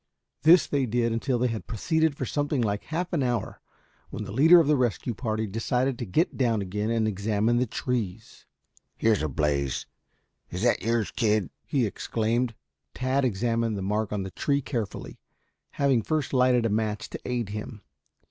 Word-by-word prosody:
This 165 +3 +7
they 140 -3 0
did 115 +1 +1
until 125 +2 0
they 125 +1 +1
had 115 -2 -5
proceeded 155 +7 0
for 130 - -2
something 145 +1 -1
like 100 -1 -2
half 175 +3 -3
an 160 - +1
hour, 120 -2 -2 0.5
when - - -5
the - - -7
leader 160 - +7
of 165 - +4
the 150 +1 +3
rescue 125 -1 0
party 110 -1 -2
decided 125 +5 -1
to 120 - -4
get 160 - +1
down 115 -5 +2
again 105 +3 -2
and 115 -1 +1
examine 105 +3 +1
the 125 +1 +1
trees. 110 -5 -4 0.5
"Here's 110 -2 +2
a 75 - -1
blaze. 70 -1 -1 0.6
Is 90 +4 -4
that 120 - +3
yours, 115 -2 0
kid?" 105 -5 +1 0.2
he 135 -5 +1
exclaimed. 115 +3 -1 0.4
Tad 130 +2 0
examined 115 -1 0
the 95 - -4
mark 105 +2 -1
on 105 -2 -2
the 95 - -6
tree 140 - 0
carefully, 115 -7 -5 0.5
having 135 -4 +2
first 155 +1 -2
lighted 125 -2 +3
a - - +2
match 105 0 -1
to - - -5
aid 120 -4 -2
him. 105 +1 -7
115 Hz, 175 wpm, -26 LUFS, 105-130 Hz, 0.6 s, This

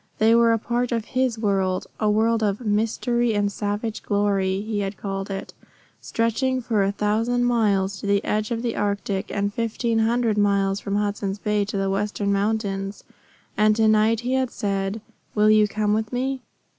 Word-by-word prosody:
They 220 +1 +4
were 230 0 +5
a 225 - +3
part 240 +2 -2
of 230 -2 -1
his 255 -2 0
world 195 -4 0
a 215 - +2
world 225 +2 +2
of 205 -2 0
"mystery 230 +2 0
and 205 0 +1
savage 205 +2 -3
glory" 200 -2 0
he 215 0 -3
had 195 0 -3
called 195 0 -4
it, 195 0 -5 0.5
stretching 245 +3 0
for 230 -4 0
a 195 0 +2
thousand 225 +4 0
miles 200 -5 +1
to - - -5
the 200 0 +1
edge 215 0 -1
of 235 -1 -2
the 235 -2 -1
Arctic, 200 -1 -2
and 200 0 -1
fifteen 230 0 -1
hundred 225 -1 +1
miles 200 -1 +2
from 200 0 -3
Hudson's 205 -1 -1
Bay 210 0 0
to 200 0 -4
the 195 0 0
western 200 0 -1
mountains. 200 -1 -2 0.5
And 215 0 +4
to 220 0 +3
night 215 +1 +3
he 250 +2 -2
had 260 -1 +1
said, 195 0 -2 0.3
"Will 210 0 +5
you 215 -1 +5
come 210 0 0
with 220 0 -1
me?" 260 +1 -2
210 Hz, 180 wpm, -23 LUFS, 200-230 Hz, 0.5 s, were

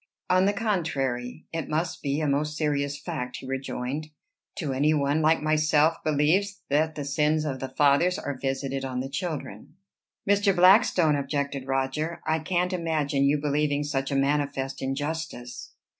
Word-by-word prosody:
"On 185 +1 +4
the 200 - +4
contrary, 150 - -2
it 165 -1 -3
must 160 +2 -2
be 140 +2 -1
a 155 - 0
most 150 +2 0
serious 145 -2 0
fact," 135 -8 -5
he - - -10
rejoined, 135 +2 -4 0.5
"to 145 -6 -3
any 150 +4 +2
one 140 0 +1
who - - +1
like 160 0 +3
myself 155 +1 +3
believes 165 +7 +1
that 155 +2 +2
the 145 - -4
sins 150 +2 +1
of 135 -3 -3
the 135 - -4
fathers 145 +7 +3
are 145 - -4
visited 135 0 -2
on 130 -1 -3
the 135 - -5
children." 155 +2 -5 0.5
"Mr. 200 -1 +3
Blackstone," 180 -4 +5
objected 140 -1 -2
Roger, 135 +5 -1
"I 160 +1 +1
can't 180 +3 0
imagine 155 -5 0
you 145 +2 +3
believing 145 0 0
such 135 -2 -2
a 140 - -1
manifest 140 -1 0
injustice." 135 -2 -4
150 Hz, 160 wpm, -26 LUFS, 135-160 Hz, 0.5 s, Blackstone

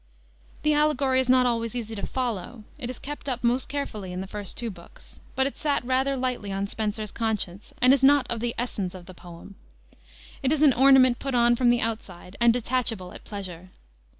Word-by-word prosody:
The 305 0 +3
allegory 285 -3 +2
is 260 -1 0
not 255 0 +5
always 230 -1 -1
easy 225 -2 -4
to 200 - -4
follow. 240 -3 -4 0.2
It 245 -4 -4
is 255 - -6
kept 290 0 -7
up 250 -1 -3
most 245 +2 +1
carefully 215 -10 -4
in 180 - -5
the 190 - -4
first 205 -1 -7
two 235 -2 -3
books, 170 -3 -15 0.2
but 265 - +2
it 275 - -4
sat 290 -5 0
rather 265 +2 +1
lightly 250 -6 -2
on 195 +1 -1
Spenser's 215 0 -3
conscience, 210 -4 -2
and 255 +1 +7
is 275 -1 +1
not 285 0 +6
of 235 - -2
the 235 +1 -2
essence 200 -6 -3
of 180 -1 -10
the 185 - -11
poem. 175 +2 -12 0.9
It 270 -1 +1
is 310 -1 +2
an 285 -4 +6
ornament 255 -1 +6
put 275 -2 -3
on 240 0 +4
from 245 0 +3
the 240 0 +3
outside 200 -5 -5
and 235 0 +6
detachable 230 -6 -1
at - - -11
pleasure. 185 -3 -8
240 Hz, 205 wpm, -26 LUFS, 205-260 Hz, 0.9 s, and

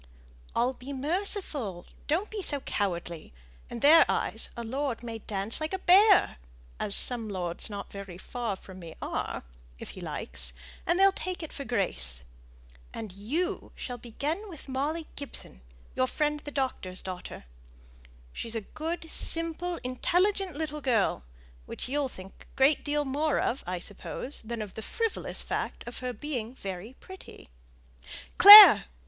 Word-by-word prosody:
"I'll 245 +2 +1
be 260 +2 -9
merciful; 290 - 0 0.2
don't 350 +8 -1
be 430 -2 -4
so 290 -6 -2
cowardly. 175 - -4 0.4
In 235 - -7
their 320 +3 +8
eyes - - 0
a 235 - -4
lord 255 0 -3
may 230 -1 -6
dance 205 +4 -3
like 310 +4 -3
a - - 0
bear 385 +2 +5 0.4
as 200 - +1
some 235 -3 +4
lords 180 -2 -3
not 200 -1 -7
very 195 -3 -9
far 230 +1 -4
from 190 0 -13
me 165 -2 -10
are - - -4 0.3
if - - -9
he - - -11
likes, - - -4 0.3
and 345 - +2
they'll 390 +1 +6
take 370 -2 -5
it 315 - -7
for 280 - -6
grace. 65 - 0 0.7
And 220 -3 -7
you 300 - -3
shall 245 -2 -7
begin 300 - -4
with 320 -6 -11
Molly 290 +5 -2
Gibson, 280 - -3 0.3
your 130 - +1
friend 300 - -1
the 290 - -9
doctor's 255 -10 -3
daughter. 185 - -8 0.9
She's 230 0 -4
a 225 - -2
good, 320 - -6
simple, 335 +1 -1
intelligent 360 +8 0
little 300 -1 -4
girl, 225 - 0 0.4
which - - -6
you'll 280 +1 -1
think 190 -4 -13
a - - -26
great 270 +2 +3
deal 295 0 -1
more 290 +3 0
of, 260 - -1
I 180 0 -2
suppose, 205 +9 -5
than 230 0 -5
of 205 - -10
the 220 - -7
frivolous 455 - -3
fact - - -4
of 240 - -7
her 250 -1 -3
being 250 -3 -5
very 195 +3 -7
pretty. 375 - -13 0.9
Clare! 410 +2 +12
260 Hz, 155 wpm, -28 LUFS, 205-320 Hz, 0.9 s, Clare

